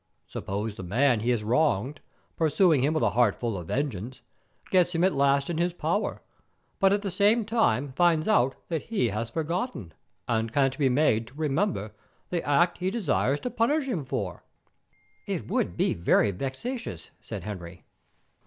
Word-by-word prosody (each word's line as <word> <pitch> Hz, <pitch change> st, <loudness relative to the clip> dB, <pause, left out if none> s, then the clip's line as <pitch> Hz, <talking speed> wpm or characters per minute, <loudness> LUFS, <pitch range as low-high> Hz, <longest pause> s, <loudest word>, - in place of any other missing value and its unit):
Suppose 105 Hz, +3 st, -4 dB
the 100 Hz, -, -9 dB
man 120 Hz, +7 st, +2 dB
he 115 Hz, +3 st, -1 dB
has 120 Hz, -3 st, +1 dB
wronged, 130 Hz, +2 st, +1 dB, 0.3 s
pursuing 160 Hz, -2 st, +3 dB
him 150 Hz, +3 st, +1 dB
with 155 Hz, -, +1 dB
a -, -, +3 dB
heart 120 Hz, -4 st, +3 dB
full 115 Hz, -3 st, -2 dB
of 90 Hz, -3 st, -6 dB
vengeance, 125 Hz, -, -3 dB, 0.5 s
gets 180 Hz, -2 st, +3 dB
him 165 Hz, -, +2 dB
at 190 Hz, -, +3 dB
last 140 Hz, 0 st, +2 dB
in 170 Hz, -2 st, -2 dB
his 175 Hz, 0 st, +1 dB
power, 175 Hz, +5 st, -2 dB, 0.6 s
but 195 Hz, 0 st, +4 dB
at 200 Hz, +1 st, +1 dB
the 200 Hz, -, -2 dB
same 210 Hz, +5 st, +3 dB
time 205 Hz, -, +1 dB
finds 165 Hz, 0 st, +3 dB
out 135 Hz, -, +3 dB
that 165 Hz, -3 st, -1 dB
he 205 Hz, -, 0 dB
has 110 Hz, +3 st, -3 dB
forgotten, 165 Hz, -, -3 dB, 0.3 s
and 115 Hz, -1 st, 0 dB
can't 135 Hz, 0 st, +2 dB
be 135 Hz, -3 st, +3 dB
made 125 Hz, -4 st, +2 dB
to 130 Hz, -, -16 dB
remember, 150 Hz, -, -1 dB, 0.4 s
the 175 Hz, -2 st, -1 dB
act 170 Hz, +5 st, +2 dB
he 180 Hz, +1 st, 0 dB
desires 150 Hz, -, 0 dB
to 250 Hz, -, -3 dB
punish 280 Hz, +6 st, +1 dB
him 225 Hz, -, -1 dB
for." 100 Hz, -9 st, -4 dB, 0.8 s
"It -, -, -3 dB
would -, -, -1 dB
be -, -, +2 dB
very 85 Hz, +4 st, +3 dB
vexatious," 140 Hz, -, -5 dB
said 105 Hz, -5 st, -7 dB
Henry.. 90 Hz, -3 st, -8 dB
140 Hz, 170 wpm, -27 LUFS, 115-180 Hz, 0.8 s, but